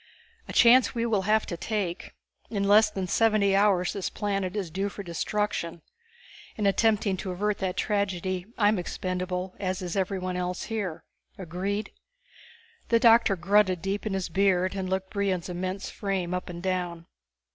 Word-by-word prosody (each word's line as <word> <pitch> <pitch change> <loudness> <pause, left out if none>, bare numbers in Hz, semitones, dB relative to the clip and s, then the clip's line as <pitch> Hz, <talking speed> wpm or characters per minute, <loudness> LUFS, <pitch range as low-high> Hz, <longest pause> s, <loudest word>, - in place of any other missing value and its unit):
"A - - -6
chance 245 +1 +6
we 230 0 0
will 215 -4 +1
have 220 0 +3
to 170 - -4
take. 195 -1 -3 0.3
In 200 -2 -1
less 210 +1 +6
than 195 -3 -3
seventy 210 0 +3
hours 195 -3 +3
this 195 -3 -3
planet 195 -2 -2
is 190 -6 -3
due 195 +4 -1
for 200 - -8
destruction. 170 -1 -2 0.7
In 210 - -2
attempting 205 0 +2
to 190 - -5
avert 205 +3 -1
that 185 -2 -2
tragedy 185 -2 -1
I'm 210 -2 +3
expendable, 185 +1 -3
as 185 -1 -2
is 175 -2 -4
everyone 185 -1 -1
else 180 0 -3
here. 205 -8 -4 0.3
Agreed?" 190 +4 -3 1.0
The 230 - +4
doctor 230 -3 +5
grunted 185 0 +2
deep 200 +2 -2
in 205 - -2
his 190 -2 -2
beard 185 0 +2
and 190 -2 -3
looked 190 0 -2
Brion's 195 -4 -1
immense 185 +2 -4
frame 190 -4 -2
up 180 0 -3
and 175 0 -7
down. 175 -3 -2
195 Hz, 160 wpm, -27 LUFS, 180-205 Hz, 1.0 s, chance